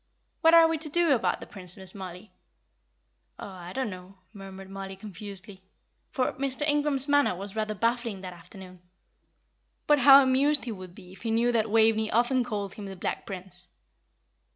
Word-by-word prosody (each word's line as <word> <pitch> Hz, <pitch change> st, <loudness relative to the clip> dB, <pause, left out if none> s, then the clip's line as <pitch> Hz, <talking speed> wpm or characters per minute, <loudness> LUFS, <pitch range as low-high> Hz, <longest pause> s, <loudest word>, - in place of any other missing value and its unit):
What 325 Hz, 0 st, +6 dB
are 330 Hz, -1 st, +8 dB
we 325 Hz, -1 st, -1 dB
to 310 Hz, 0 st, -4 dB
do 340 Hz, +1 st, +2 dB
about 240 Hz, -, 0 dB
the -, -, -7 dB
Prince, 180 Hz, -3 st, -9 dB
Miss 190 Hz, -1 st, -10 dB
Mollie?" 185 Hz, +1 st, -9 dB, 1.1 s
"Oh, -, -, -8 dB
I 180 Hz, -2 st, -9 dB
don't 260 Hz, 0 st, -2 dB
know," 185 Hz, +1 st, -11 dB, 0.2 s
murmured 195 Hz, -1 st, -10 dB
Mollie, 195 Hz, 0 st, -7 dB
confusedly; 195 Hz, -1 st, -9 dB, 0.5 s
for 255 Hz, -, -1 dB
Mr. 275 Hz, +1 st, -2 dB
Ingram's 290 Hz, -2 st, +1 dB
manner 285 Hz, -8 st, +3 dB
was 195 Hz, +3 st, -8 dB
rather 215 Hz, -1 st, -2 dB
baffling 230 Hz, -2 st, -1 dB
that 185 Hz, -1 st, -7 dB
afternoon. 180 Hz, +1 st, -13 dB, 1.0 s
But 295 Hz, -1 st, +4 dB
how 275 Hz, 0 st, +9 dB
amused 275 Hz, +3 st, +2 dB
he 240 Hz, -, -4 dB
would 185 Hz, -4 st, -9 dB
be 180 Hz, -, -14 dB
if 190 Hz, -, -15 dB
he 230 Hz, -, -3 dB
knew 230 Hz, +2 st, +2 dB
that 225 Hz, -2 st, +1 dB
Waveney 220 Hz, 0 st, +3 dB
often 245 Hz, +3 st, +2 dB
called 205 Hz, -4 st, -4 dB
him 205 Hz, -2 st, -8 dB
the 195 Hz, -, -7 dB
Black 180 Hz, -, -4 dB
Prince. 180 Hz, -2 st, -8 dB
210 Hz, 175 wpm, -27 LUFS, 190-260 Hz, 1.1 s, how